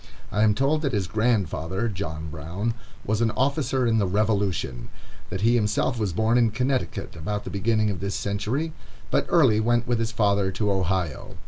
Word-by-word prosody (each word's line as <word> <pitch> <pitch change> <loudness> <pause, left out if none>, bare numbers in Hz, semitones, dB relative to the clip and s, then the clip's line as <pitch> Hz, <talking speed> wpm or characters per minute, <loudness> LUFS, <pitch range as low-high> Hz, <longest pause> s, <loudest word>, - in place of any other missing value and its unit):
I 105 - +1
am 105 -1 +4
told 145 +5 +2
that 140 -4 -1
his 100 -3 +1
grandfather, 100 -2 0
John 80 -7 -4
Brown, 85 +9 -3 0.3
was 110 +2 0
an 115 - +3
officer 135 -1 +1
in 115 -1 +3
the 100 - +2
Revolution; 100 - 0 0.4
that 95 +1 -4
he 115 +3 +4
himself 115 +2 +1
was 105 -4 0
born 110 +7 +2
in 115 -2 +4
Connecticut 125 0 -2
about 105 +6 -3
the - - -6
beginning 110 +1 +1
of 95 - -4
this 100 0 -3
century, 120 +11 -2 0.4
but - - +2
early 135 -11 +5
went 120 +1 +2
with 120 -2 +1
his 115 0 -1
father 100 -3 +2
to 105 +2 0
Ohio. 95 -5 -1
105 Hz, 185 wpm, -25 LUFS, 95-120 Hz, 0.4 s, early